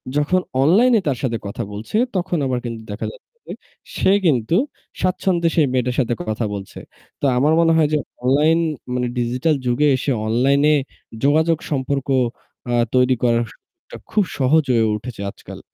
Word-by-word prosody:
যখন 150 +5 +2 0.2
অনলাইনে 225 - +5
তার 135 -4 0
সাথে 115 -3 0
কথা 100 - -4
বলছে, 110 - -7 0.2
তখন 180 -1 -1
আবার 125 -2 -1
কিন্তু 115 -1 -5
দেখা 105 - -4
যাচ্ছে - - -18 0.2
যে - - -5 0.4
সে - - +3
কিন্তু 130 -1 +2 0.5
স্বাচ্ছন্দ্যে 180 -2 +1
সেই 155 -4 +4
মেয়েটার 125 -1 0
সাথে 120 -2 +1
কথা 110 +1 -1
বলছে। 100 -1 -8 0.4
তো - - 0
আমার 150 +5 +3
মনে 165 -1 +4
হয় 155 -2 +4
যে - - +4 0.3
অনলাইন 150 +6 +3 0.3
মানে 125 -1 -1
Digital 125 +6 +1
যুগে 125 +5 +2
এসে 135 +2 -2 0.2
অনলাইনে 140 +6 +3 0.5
যোগাযোগ 160 +3 +3
সম্পর্ক 135 0 -1 0.6
আ - - 0 0.2
তৈরি 125 0 +4
করাটা 115 -1 -3
খুব 210 -2 +3
সহজ 145 +4 +3
হয়ে 115 -2 +3
উঠেছে 105 -1 -8
আজকাল। - - -12
135 Hz, 155 wpm, -20 LUFS, 120-160 Hz, 0.6 s, অনলাইনে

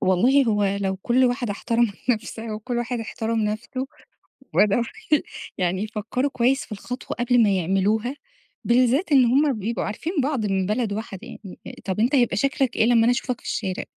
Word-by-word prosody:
والله 245 +10 +4
هو 210 -3 +1 0.2
لو 190 -1 -1
كل 240 +7 +2
واحدة 245 -3 0
احترمت 230 +1 0 0.2
نفسها 225 -1 -3
وكل 240 +3 -4
واحد 240 0 -2
احترم 225 0 -2
نفسه 245 +5 -3 0.7
وبدأوا 210 +3 +3 0.7
يعني 185 +1 0
يفكروا 220 +5 -2
كويس 255 +3 +1
في - - -27
الخطوة 245 +5 -6
قبل 240 -1 +4
ما 210 - +3
يعملوها، 200 - 0 0.5
بالذات 255 +8 +3
إن 265 -3 +6
هم 275 +4 +3
بيبقوا 225 +4 -2
عارفين 315 - -4
بعض 270 -7 -1
من 195 -2 0
بلد 215 +1 -1
واحدة 205 -3 -5
يعني، 195 -5 -11 0.3
طب 190 -1 -2
أنت 240 +6 +2
يبقى 240 -8 +3
شكلك 270 +1 0
إيه - - +3
لما 235 -1 +4
أنا 235 - +4
أشوفك 245 0 -2
في - - -11
الشارع؟! 190 -4 -2
230 Hz, 170 wpm, -23 LUFS, 210-250 Hz, 0.7 s, إن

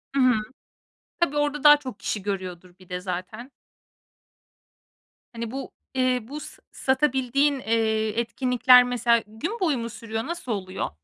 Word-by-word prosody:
Hı 275 - +2
hı, 255 -1 +5 0.9
tabii, 295 -4 +1
orada 295 0 0
daha 295 0 +10
çok 260 -7 -9
kişi 205 - -3
görüyordur 185 -3 -5
bir 185 -1 -18
de 180 0 -4
zaten. 185 +8 -6 1.8
Hani, 230 -1 -5
bu, 270 +1 -6 0.2
eee, 255 -1 +2
bu 290 +4 -6
s - - -10
satabildiğin, 270 +1 +1
eee, 220 -1 0
etkinlikler, 250 +1 +5
mesela, 240 -1 +2
gün 320 - -5
boyu 320 -8 +1
mu 230 0 -4
sürüyor? 225 0 -5
Nasıl 340 -7 -5
oluyor? 190 -3 -3
245 Hz, 140 wpm, -25 LUFS, 220-275 Hz, 1.8 s, daha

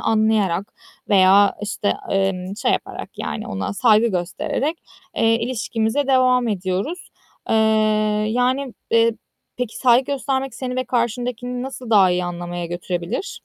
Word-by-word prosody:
anlayarak 215 -4 +1 0.4
veya, 195 0 +5
işte, 210 -1 -1 0.2
emm, 195 0 -1
şey - - +1
yaparak - - -4
yani - - -4
ona 95 - -3
saygı 220 +1 +4
göstererek, 280 - -2 0.4
eee, 225 0 +3
ilişkimize 230 +2 -1
devam 255 -2 +3
ediyoruz. 195 - -3 0.4
Iıı, 215 -1 +2
yani, 250 +3 0 0.2
eee, 230 0 +4 0.4
peki 245 -2 -4
saygı 255 +2 +3
göstermek 270 -2 -2
seni 250 0 -4
ve 255 - -1
karşındakini 245 +1 -2
nasıl 255 -3 -7
daha 195 -4 +6
iyi 180 0 0
anlamaya 175 0 -5
götürebilir? 175 - -4
220 Hz, 125 wpm, -21 LUFS, 195-250 Hz, 0.4 s, daha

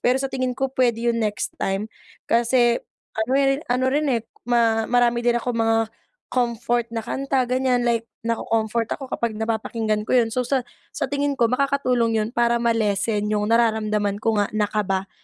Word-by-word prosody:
Pero 250 +1 +3
sa 270 - -2
tingin 255 -1 -1
ko, 270 -1 -1
puwede 240 -3 +1
yun 230 - -1
next 210 -1 -2
time 195 +2 -1 0.5
kasi 235 0 +3 0.3
ano 220 +2 -2
ri 275 0 +3
ano 250 +1 +1
rin, 300 +1 +1
eh, 235 -4 +1 0.3
ma 225 -2 +2
marami 240 -1 +3
din 240 0 +2
akong 240 0 -2
mga 225 0 +3 0.5
comfort 240 -1 0
na 225 - -1
kanta 270 +3 -1
ganiyan, 255 -1 +1
like 230 -1 +1 0.2
nako-comfort 230 0 -1
ako 270 -3 -8
kapag 235 -2 -1
napapakinggan 220 -1 -1
ko - - -2
yun. 240 -3 +4
So, 250 +2 -1
sa 265 -1 +1 0.3
sa 265 - -2
tingin 285 0 0
ko 235 -3 +2
makakatulong 250 -4 +1
yun 215 - -3
para 235 0 +1
ma-lessen 210 -2 +1
yung 210 +1 0
nararamdaman 215 -3 +1
ko 225 -2 +1
nga 205 - +2
na 210 -1 0
kaba 195 -2 -1
235 Hz, 175 wpm, -23 LUFS, 220-250 Hz, 0.5 s, yun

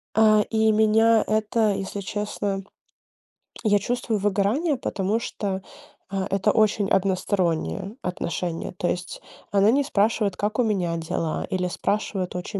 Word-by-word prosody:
А, 215 -1 +5
и 220 -1 +3
меня 220 +1 +4
это, 215 0 +1
если 195 +1 -4
честно 200 -1 -3 1.0
я 205 -2 +4
чувствую 225 0 -1
выгорание, 210 - +1
потому 205 -2 -1
что, 195 -4 -4 0.5
э, 195 -1 -1
это 195 +2 +2
очень 215 -2 +2
одностороннее 190 +1 0
отношение, 175 -1 -3
то 175 - -1
есть 175 0 -4 0.3
она 200 +2 +4
не 280 +3 +3
спрашивает, 210 -5 +1
как 215 +3 -2
у - - +5
меня 185 -6 0
дела, 165 -1 -2
или 180 -1 -1
спрашивает 195 -1 -2
очень 185 +3 -4
205 Hz, 135 wpm, -24 LUFS, 190-220 Hz, 1.0 s, А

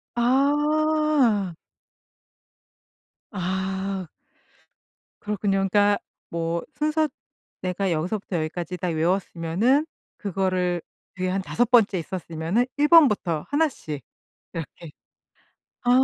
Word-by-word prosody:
아. 290 - +2 1.8
아. 190 -1 -2 1.1
그렇군요. 205 -2 0
그러니까 205 0 +4 0.3
뭐 165 0 -2
순서 310 +1 +1 0.5
내가 185 +1 -1
여기서부터 180 +4 -2
여기까지 165 +2 -3
다 180 +1 -3
외웠으면은 175 - +1 0.3
그거를 185 -3 0 0.3
뒤에 185 0 -2
한 190 +1 0
5 240 +5 0
번째 220 -6 +5
있었으면은 170 +5 -1
1 295 +1 +3
번부터 210 - +5
1 310 +2 +3
씩 150 - -7 0.5
이렇게 165 0 -7 0.9
아. 245 - +1
195 Hz, 190 characters per minute, -25 LUFS, 175-245 Hz, 1.8 s, 번째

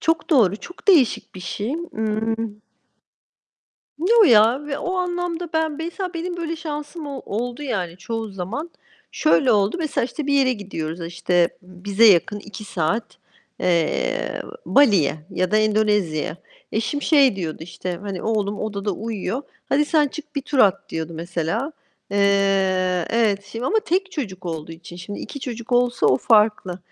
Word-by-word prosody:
Çok 325 +2 0
doğru. 215 - +4
Çok 355 - -12
değişik 300 - +4
bir 185 - -8
şey. 205 +7 -3
Imm 220 -9 -2 1.6
Yo 435 +7 +5
ya. 235 - +5
Ve 285 -1 -3
o 365 +5 -2
anlamda 355 -1 -2
ben, 320 -1 +1
mesela, 345 +3 -4
benim 350 +1 -3
böyle 330 -1 -3
şansım 300 0 -6
o 275 -2 -5
oldu 240 +6 -3
yani 190 -11 -3
çoğu 225 +4 -4
zaman. 205 - -5 0.4
Şöyle 280 -5 +3
oldu, 205 - +2
mesela, 310 -7 0
işte 270 +4 -5
bir 285 - +1
yere 265 -2 +4
gidiyoruz, 180 -7 -5
işte 175 0 +2
bize 190 +4 0
yakın 200 +1 +4
2 210 +1 -9
saat, 195 +4 -2 0.4
eee, 170 -3 0 0.2
Bali'ye 200 - +4
ya 185 -1 -1
da 215 - +3
Endonezya'ya. 210 -8 +1 0.4
Eşim, 230 +7 -1
şey 275 -9 +5
diyordu 165 -5 -3
işte, 175 +1 -5
hani 195 -3 -5
oğlum 210 -2 -1
odada 205 -1 -2
uyuyor, 225 +5 -3 0.3
"Hadi 290 +2 +3
sen 300 -1 +3
çık 300 +1 -10
bir 280 - 0
tur 280 0 -2
at." 200 -5 +4
diyordu 160 0 -4
mesela. 175 - -2 0.4
Eee, 195 -3 +2
evet 210 -4 +2
şimdi 225 +3 -6
ama 440 +7 +2
tek 385 -2 -1
çocuk 190 - -5
olduğu 165 -1 -5
için. 170 +1 -11
Şimdi, 185 +4 -7
2 280 - -7
çocuk 235 -2 -6
olsa 245 0 +3
o - - +5
farklı. 210 -5 +3
220 Hz, 155 wpm, -22 LUFS, 190-290 Hz, 1.6 s, Yo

